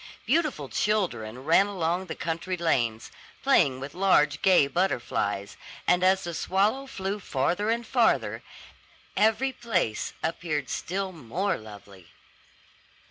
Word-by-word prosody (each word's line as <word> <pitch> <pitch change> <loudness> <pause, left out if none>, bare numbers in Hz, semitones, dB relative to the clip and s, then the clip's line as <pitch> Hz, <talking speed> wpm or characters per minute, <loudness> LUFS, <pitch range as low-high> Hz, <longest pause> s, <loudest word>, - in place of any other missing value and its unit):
Beautiful 280 - 0
children 130 - -1
ran 180 +5 +5
along 180 -1 -1
the - - -5
country 170 +3 -3
lanes, 120 -10 0 0.3
playing 160 - +3
with 140 +2 -7
large 155 -6 +3
gay 185 -6 +5
butterflies; 120 - -1 0.3
and 180 0 +3
as 190 +1 +4
the 170 -1 -4
swallow 205 - 0
flew 195 -4 -4
farther 175 +6 -1
and 235 +1 0
farther, - - +1 0.7
every 225 +5 +2
place 185 - -1
appeared 155 -5 -2
still 190 +2 -3
more 170 - -2
lovely. 100 -4 -12
175 Hz, 120 wpm, -27 LUFS, 135-195 Hz, 0.7 s, ran